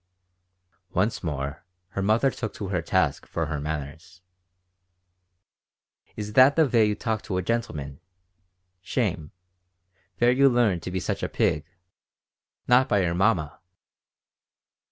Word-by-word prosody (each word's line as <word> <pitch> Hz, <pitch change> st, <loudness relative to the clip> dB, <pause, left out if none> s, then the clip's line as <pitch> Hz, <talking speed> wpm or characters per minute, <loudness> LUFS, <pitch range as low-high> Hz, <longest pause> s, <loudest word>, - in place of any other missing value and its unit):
Once 100 Hz, +5 st, 0 dB
more 75 Hz, -1 st, -4 dB, 0.3 s
her 100 Hz, -, -4 dB
mother 110 Hz, +7 st, +2 dB
took 110 Hz, -3 st, -6 dB
her 95 Hz, -4 st, -2 dB
to -, -, -19 dB
task -, -, +1 dB
for 80 Hz, -, -2 dB
her 75 Hz, -1 st, -3 dB
manners 80 Hz, +4 st, -6 dB, 1.9 s
"Is 105 Hz, 0 st, -6 dB
that 130 Hz, +4 st, +6 dB
the 160 Hz, -, +5 dB
vay 115 Hz, -5 st, +3 dB
to 105 Hz, -, 0 dB
talk 110 Hz, -1 st, -2 dB
to 95 Hz, -4 st, -4 dB
a 90 Hz, -, -1 dB
gentleman? 75 Hz, -12 st, -3 dB, 0.8 s
Shame! 90 Hz, -, -2 dB, 0.9 s
Vere 120 Hz, +4 st, +4 dB
you 135 Hz, +2 st, +5 dB
lea'n 120 Hz, -7 st, +2 dB
up -, -, -11 dB
to 90 Hz, -, -5 dB
be 95 Hz, +1 st, -2 dB
such -, -, -3 dB
a -, -, -2 dB
pig? 75 Hz, 0 st, 0 dB, 1.0 s
Not 125 Hz, +2 st, +4 dB
by 100 Hz, -2 st, +3 dB
your 85 Hz, -1 st, 0 dB
mamma!" 85 Hz, -5 st, +1 dB
95 Hz, 135 wpm, -25 LUFS, 80-115 Hz, 1.9 s, that